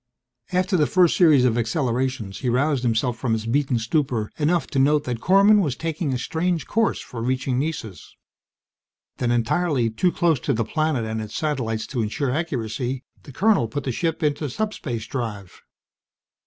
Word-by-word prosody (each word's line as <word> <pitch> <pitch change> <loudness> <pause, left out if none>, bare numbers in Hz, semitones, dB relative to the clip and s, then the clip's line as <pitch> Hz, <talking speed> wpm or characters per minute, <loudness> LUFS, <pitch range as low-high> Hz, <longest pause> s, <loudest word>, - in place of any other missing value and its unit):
After 185 +1 +1
the 150 -3 +3
first 180 -3 +4
series 150 -8 +5
of 120 -1 +2
accelerations, 120 -3 -1
he 130 - -1
roused 135 +2 +1
himself 120 0 0
from 120 -4 0
his 110 0 -2
beaten 135 +1 +1
stupor 115 -2 -1
enough 165 +3 +2
to 135 - 0
note 145 +2 +3
that 125 -4 -3
Korman 200 - +5
was 145 -9 -1
taking 160 0 -3
a 130 - 0
strange 165 +4 -1
course 225 -1 +1
for 120 -3 -7
reaching 130 +1 0
Nessus. 135 - -5 1.0
Then, 125 - -1
entirely 120 +1 +1
too 175 +11 +1
close 170 -6 +2
to 140 - -1
the 115 -1 -1
planet 155 -6 0
and 110 0 -3
its 110 -1 -7
satellites 120 -8 -2
to 125 - -3
ensure 125 +5 -1
accuracy, 130 -4 -3 0.2
the 140 - -12
colonel 195 - +2
put 140 +6 -4
the 130 - -2
ship 165 +6 -2
into 150 0 0
subspace 130 - -3
drive. 105 -6 -5
130 Hz, 170 wpm, -23 LUFS, 115-160 Hz, 1.0 s, series